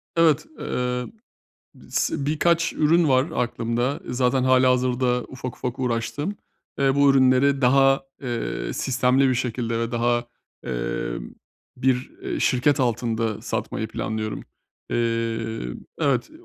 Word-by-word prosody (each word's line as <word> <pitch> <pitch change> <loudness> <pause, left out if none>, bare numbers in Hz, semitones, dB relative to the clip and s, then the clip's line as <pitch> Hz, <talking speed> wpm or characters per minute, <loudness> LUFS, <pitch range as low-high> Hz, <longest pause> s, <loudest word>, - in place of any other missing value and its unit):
Evet, 165 -2 +4
eee, 125 0 -2 0.8
sı 140 - -1
birkaç 165 +3 +2
ürün 160 +2 +3
var 130 0 +4 0.2
aklımda, 120 +3 -2
zaten 125 +1 +1
hâlihazırda 125 -1 +3
ufak 125 -1 -7
ufak 125 -1 -4
uğraştığım, 130 - -2 0.4
eee, 135 -1 +3
bu 140 -1 +5
ürünleri 135 +1 +4
daha, 135 +2 +4 0.2
eee, 120 -3 -3
sistemli 130 +1 +2
bir 130 - +1
şekilde 115 -2 -2
ve 115 0 -2
daha, 120 0 +1 0.4
emm, - - -4 0.4
bir, 130 0 0
eee, 370 -4 -3
şirket 130 +3 +2
altında 115 -3 0
satmayı - - -3
planlıyorum. 110 +1 -4 0.5
Eee, 115 - -1 0.3
evet, 140 -5 +1
125 Hz, 115 wpm, -24 LUFS, 120-135 Hz, 0.8 s, bu